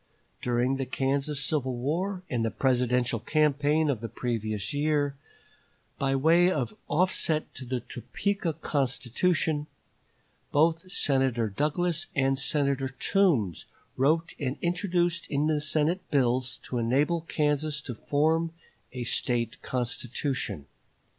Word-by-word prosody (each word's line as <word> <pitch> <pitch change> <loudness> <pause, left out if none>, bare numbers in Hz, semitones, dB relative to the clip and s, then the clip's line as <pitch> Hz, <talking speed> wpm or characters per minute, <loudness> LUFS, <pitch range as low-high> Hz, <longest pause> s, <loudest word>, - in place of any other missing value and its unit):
During 125 +2 +1
the 135 -1 -3
Kansas 140 +2 0
civil 130 -5 0
war 180 +9 -2
and 120 -7 -1
the 115 - +1
Presidential 125 -2 +1
campaign 150 +3 +2
of 130 -7 0
the 115 - -4
previous 110 -3 -2
year, 145 -1 +1 0.8
by 135 0 +1
way 165 +6 +5
of 130 -9 -2
offset 160 -1 +1
to 130 - -8
the 125 0 -2
Topeka 165 - -2
Constitution, 150 +2 0 0.8
both 165 +4 +2
Senator 130 - +1
Douglas 165 - 0
and 135 0 +2
Senator 140 -1 0
Toombs 130 - +1 0.3
wrote 160 +5 +2
and 135 -3 -2
introduced 175 -1 0
in 145 +1 0
the 155 -1 +1
Senate 155 +4 +1
bills 130 -2 +1
to 125 - -3
enable 140 +8 +2
Kansas 150 -1 0
to 130 - -6
form 160 +6 +1 0.4
a 125 -2 -3
State 120 -1 -1
constitution. 125 - -2
140 Hz, 120 wpm, -28 LUFS, 125-160 Hz, 0.8 s, way